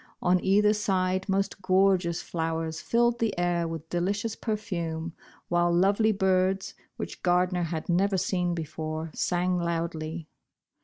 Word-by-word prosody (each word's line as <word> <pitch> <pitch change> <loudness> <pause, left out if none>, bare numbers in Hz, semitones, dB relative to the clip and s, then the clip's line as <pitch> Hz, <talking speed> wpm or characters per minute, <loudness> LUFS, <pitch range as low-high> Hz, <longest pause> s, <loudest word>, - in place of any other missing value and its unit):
On 180 0 +2
either 210 +2 +4
side 190 -2 0
most 195 0 0
gorgeous 185 -2 +2
flowers 160 -1 -3
filled 235 0 +2
the 225 -5 0
air 175 -1 +1
with 165 -1 -6
delicious 200 +5 -1
perfume, 170 -7 -3 0.3
while 175 0 +2
lovely 200 +5 +3
birds, 190 -1 +1 0.2
which - - -6
Gardner 180 0 +2
had 165 -2 -3
never 190 +3 +2
seen 180 -1 0
before, 160 0 -4
sang 180 0 0
loudly. 165 -1 -3
180 Hz, 125 wpm, -27 LUFS, 170-195 Hz, 0.3 s, either